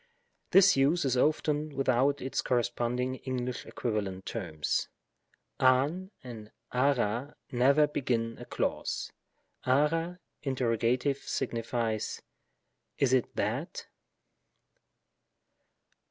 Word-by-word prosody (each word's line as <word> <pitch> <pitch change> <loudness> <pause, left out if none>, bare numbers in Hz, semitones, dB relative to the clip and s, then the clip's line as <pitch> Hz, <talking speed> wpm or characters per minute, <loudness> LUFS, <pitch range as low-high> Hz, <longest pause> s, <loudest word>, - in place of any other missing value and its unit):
This 195 +1 +7
use 140 +5 +3
is 130 -2 +2
often 150 +2 +1
without 135 +1 +2
its 130 - -1
cor 125 - +1
responding 120 +2 -1
Eng. 125 -1 -3 0.2
equivalent 100 -5 -3
terms, 80 -9 -2 0.7
av 140 +9 +3
and 110 -4 -9 0.2
aga 125 -1 +1 0.2
never 140 +4 +5
begin 120 -6 -1
a - - -8
clause, - - -2 0.5
aga; 165 +6 +2 0.2
interrogative, 125 +1 +1
signifies, 115 -3 -2 0.4
" - - -51
is 130 -2 +2
it 130 -4 +1
that?" - - -2
130 Hz, 95 wpm, -30 LUFS, 120-140 Hz, 0.7 s, This